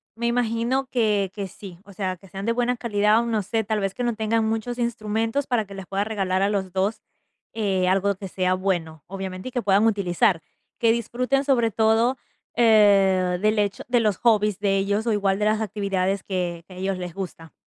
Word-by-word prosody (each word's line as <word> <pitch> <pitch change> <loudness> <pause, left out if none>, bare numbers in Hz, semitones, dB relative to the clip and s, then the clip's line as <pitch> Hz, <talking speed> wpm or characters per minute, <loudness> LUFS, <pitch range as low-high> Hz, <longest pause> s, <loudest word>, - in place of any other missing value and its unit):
me 235 +1 -2
imagino 240 +2 0
que 210 -5 +1
que 200 -2 -4
sí. 185 -1 -11
O 200 - -14
sea, 185 -1 -3
que 195 - -17
sean 195 +2 -7
de 230 - +2
buena 245 +1 0
calidad 210 -2 +2
o - - -3
no 225 -2 0
sé, 220 +3 -1
tal 215 +1 -1
vez 195 -1 -2
que 250 - -3
no 240 -2 0
tengan 220 +1 0
muchos 225 +2 -2
instrumentos 225 +2 -1
para 240 -3 +1
que 200 - -12
les 195 -1 -7
puedas 195 +1 -1
regalar 190 -3 -1
a 200 - +2
los 190 -3 -2
2 195 +3 -1 0.5
eh, 195 -4 0
algo 195 +2 +2
que 195 +1 -7
sea 185 0 0
bueno, 170 -5 -2
obviamente, 190 +1 -6
y - - -15
que 245 - -1
puedan 200 0 +3
utilizar. 185 -4 +2 0.4
Que 230 -1 +4
disfruten, 250 +4 0
sobre 240 -5 +2
todo, 225 +4 +2 0.4
eh, 195 -5 +4
del 215 +1 +2
hecho 205 -1 -1
de 245 -1 +3
los 210 -5 +1
hobbies 210 -4 +2
de 200 -1 +1
ellos, 200 +3 0
o - - +3
igual 195 -1 +1
de 210 - +1
las 215 0 +2
actividades 195 -2 -1
que 175 -3 -3
que 185 - -13
a - - -11
ellos 190 0 -2
les 180 -2 -6
gusta. 170 -4 -7
205 Hz, 215 wpm, -24 LUFS, 190-225 Hz, 0.5 s, Que